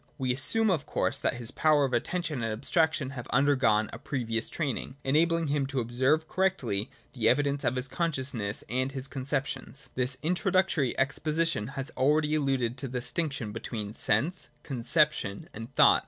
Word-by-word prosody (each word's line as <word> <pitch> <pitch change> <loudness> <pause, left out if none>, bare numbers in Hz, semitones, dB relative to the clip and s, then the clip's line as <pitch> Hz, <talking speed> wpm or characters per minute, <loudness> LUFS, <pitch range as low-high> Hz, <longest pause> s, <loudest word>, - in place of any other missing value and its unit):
We 130 -3 0
assume 220 - +3
of 160 -6 -1
course - - 0
that - - 0
his 120 -1 0
powers 150 -2 +3
of 130 - -3
attention 150 +2 -1
and 115 -1 -1
abstraction 145 +4 +1
have 125 -4 -7
undergone 130 -6 +3
a - - -6
previous 115 -4 -2
training, 135 -4 -3
enabling 165 +3 +2
him 140 -1 +1
to 135 -1 -2
observe 130 +7 +1
correctly 135 - 0 0.2
the 115 -4 +2
evidence 145 -1 +1
of 120 -1 +1
his 125 +1 -2
consciousness 130 -9 -1
and 130 +2 -1
his 135 -1 -4
con 135 -1 -6
ceptions. 135 0 -3
This 130 +1 -1
introductory 180 - +1
exposition 155 -2 0
has 135 +3 -3
already 150 +3 +2
alluded 135 -5 0
to 135 - -3
the 125 0 -3
distinction 135 -4 -3
between 110 -1 -5
Sense, 130 - 0
Conception, 130 -5 +1
and 115 +4 -8
Thought. - - +7
135 Hz, 165 wpm, -29 LUFS, 120-155 Hz, 0.2 s, Thought